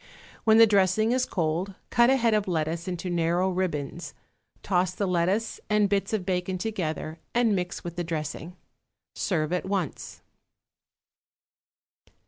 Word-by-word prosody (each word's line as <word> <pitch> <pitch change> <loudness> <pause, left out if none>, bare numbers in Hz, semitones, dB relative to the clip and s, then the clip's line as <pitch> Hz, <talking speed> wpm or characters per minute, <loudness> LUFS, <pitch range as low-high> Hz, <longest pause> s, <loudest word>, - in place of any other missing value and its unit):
When 220 -1 +6
the 230 - +9
dressing 205 +1 +3
is 255 0 +1
cold 175 +3 -1 0.2
cut 240 +1 +5
a 265 - +5
head 230 -3 +2
of 210 -2 +1
lettuce 165 0 -2
into 180 0 -4
narrow 175 +2 +1
ribbons, 170 -3 -3 0.5
toss 180 -1 +1
the 200 - -1
lettuce 185 +5 0
and 210 -1 +3
bits 195 -1 0
of 210 -5 -1
bacon 185 0 -1
together, 170 -5 -3 0.2
and 235 -4 +3
mix 180 -1 -3
with 170 0 -7
the 175 - -1
dressing. 160 +1 -5 0.6
Serve 160 -3 -1
at 180 - 0
once. 195 -1 -3
185 Hz, 140 wpm, -27 LUFS, 170-210 Hz, 0.6 s, the